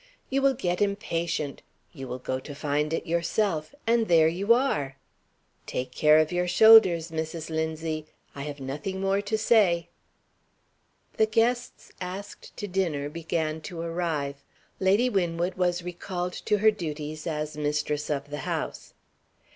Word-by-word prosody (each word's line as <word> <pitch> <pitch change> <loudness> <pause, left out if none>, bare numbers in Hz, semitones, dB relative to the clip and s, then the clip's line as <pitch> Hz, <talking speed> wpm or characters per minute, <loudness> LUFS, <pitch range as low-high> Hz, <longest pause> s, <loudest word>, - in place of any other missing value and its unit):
You 275 +1 +2
will 270 -1 +3
get 180 -6 -1
impatient 170 -7 -1 0.3
you 135 -5 -7
will 125 0 -4
go 130 0 -3
to 145 +2 -9
find 150 +1 -1
it 165 - -2
yourself 170 - -1
and 230 0 +2
there 165 -2 +5
you 190 +7 0
are. 150 - +2 0.7
Take 125 0 -3
care 150 +3 +5
of 155 0 +3
your 180 0 0
shoulders, 185 -5 +7
Mrs. 160 0 -4
Linzie! 160 0 -2 0.3
I 140 - -7
have 145 0 -6
nothing 145 +8 -4
more 195 +1 +1
to 210 +2 -1
say." 200 -7 +3 1.3
The 220 - +4
guests 235 +3 0
asked 185 +3 -7
to 205 - -4
dinner 170 -7 -1
began 160 0 -2
to 165 +2 -7
arrive. 165 -5 -2 0.4
Lady 200 +6 +3
Winwood 175 -4 0
was 180 -1 0
recalled 180 0 -4
to 210 - +3
her 215 +2 +5
duties 155 -5 -5
as 150 -1 -3
mistress 150 0 -1
of 145 -1 -3
the 150 - -4
house. - - -4
170 Hz, 145 wpm, -27 LUFS, 150-195 Hz, 1.3 s, shoulders